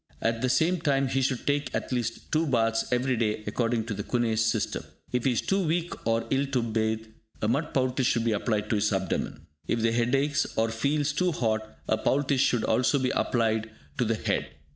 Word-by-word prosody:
At 115 0 0
the 130 - +1
same 160 +7 +2
time, 135 -4 +2
he 135 +1 +1
should 130 -1 -1
take 145 0 0
at - - -3
least 120 -2 -3
two 155 +1 +2
baths 115 -3 +1
every 125 +1 +1
day 110 -2 -1
according 115 +1 0
to 115 - -3
the 100 - -4
Kuhne's 115 0 +1
system. 110 -1 0 0.3
If 125 -1 -1
he 130 - +3
is - - 0
too 195 0 +1
weak 170 +2 0
or 115 0 +1
ill 135 +1 +2
to 130 -3 0
bathe, 110 -1 -1 0.3
a 105 - 0
mud 140 +8 0
poultice 130 -1 +1
should 115 -3 +1
be 115 - +2
applied 105 0 0
to 110 - +3
his 105 +1 +1
abdomen. 95 -3 -2 0.2
If 115 - 0
the 115 0 +3
head 120 +2 +2
aches 140 +1 0
or 115 0 +2
feels 145 +6 0
too 180 +4 +1
hot, 110 -5 -2
a 110 - +1
poultice 140 -1 +2
should 120 -4 +2
also 125 +5 +2
be 130 -2 0
applied 110 -2 0 0.3
to 125 - +3
the 115 0 +1
head. - - -1
120 Hz, 215 wpm, -27 LUFS, 110-135 Hz, 0.3 s, he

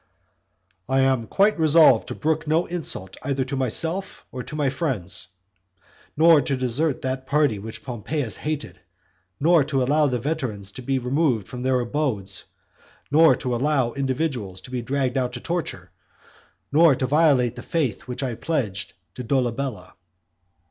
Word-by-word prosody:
"I 135 0 +3
am 130 -4 +1
quite 200 -1 +2
resolved 160 0 +5
to - - -5
brook 160 0 -1
no 160 +3 +2
insult 150 - -3
either 135 -1 -1
to 135 +2 -4
myself 160 - 0
or 125 - -5
to 150 - -8
my 145 -3 +1
friends; 115 - -3 0.9
nor 160 -1 +6
to 135 0 -1
desert 130 +4 -1
that 130 0 -3
party 145 -8 +2
which 110 +2 -8
Pompeius 125 +1 -3
hated, 150 -1 -4 0.6
nor 165 0 +4
to 135 -3 0
allow 150 +3 +3
the 125 -2 0
veterans 115 -8 -3
to 130 - -9
be 135 +2 -1
removed 125 - 0
from 125 - -7
their 130 0 +1
abodes; 115 -9 -2 0.7
nor 160 +2 +6
to 125 -2 -3
allow 135 -1 +1
individuals 130 - -2
to 125 - -12
be 125 -1 -2
dragged 130 +1 -1
out 125 -1 -2
to 125 - -5
torture, 170 +4 -4 0.8
nor 155 -1 +6
to 130 - -1
violate 135 -4 +3
the 120 - -7
faith 145 - -2
which 125 +2 -4
I 125 -3 -2
pledged 110 - -2 0.2
to 125 - -7
Dolabella." 125 -5 -2
135 Hz, 155 wpm, -23 LUFS, 125-150 Hz, 0.9 s, nor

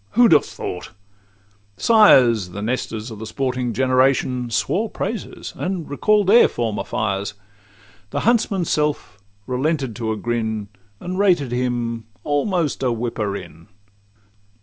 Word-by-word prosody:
who 240 +1 +6
'd - - +1
have 150 - +6
thought 90 - -6 0.9
it?'—Sires, 125 - +5
The 100 +3 -6
Nestors 115 -1 -3
of 110 - -9
the 110 - -6
sporting 125 -2 -2
generation, 130 0 +1
Swore 200 - 0
praises, 205 +1 -5
and 180 -3 -3
recall'd 210 +8 +2
their 220 +6 +7
former 115 -3 -2
fires; 100 -1 -2 0.7
The - - -2
huntsman's 215 -7 +1
self 150 -9 -1 0.3
relented 135 -1 -1
to 110 -2 -2
a 110 - -2
grin, 110 -3 -2 0.3
And 185 +1 -5
rated 175 -11 +2
him 120 -2 -2 0.2
almost 150 +1 0
a 130 -2 +1
whipper 115 -3 -2
in. 85 -3 -12
125 Hz, 130 wpm, -21 LUFS, 110-170 Hz, 0.9 s, their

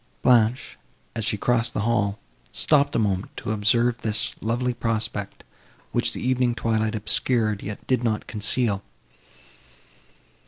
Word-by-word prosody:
Blanche, 120 0 +3 0.4
as 115 - -2
she 105 0 0
crossed 120 +2 +1
the - - 0
hall, 105 -3 0 0.3
stopped 145 -2 +2
a - - +3
moment 100 -4 -1
to - - -4
observe 115 +3 +2
this 110 0 0
lovely 120 +3 0
prospect, 110 -3 -3 0.5
which - - +1
the - - -4
evening 125 -2 +1
twilight 110 -1 0
obscured, 110 0 +1
yet 105 0 -7
did 130 -2 +1
not 110 -2 -1
conceal. 105 -1 0
115 Hz, 130 wpm, -24 LUFS, 105-120 Hz, 0.5 s, Blanche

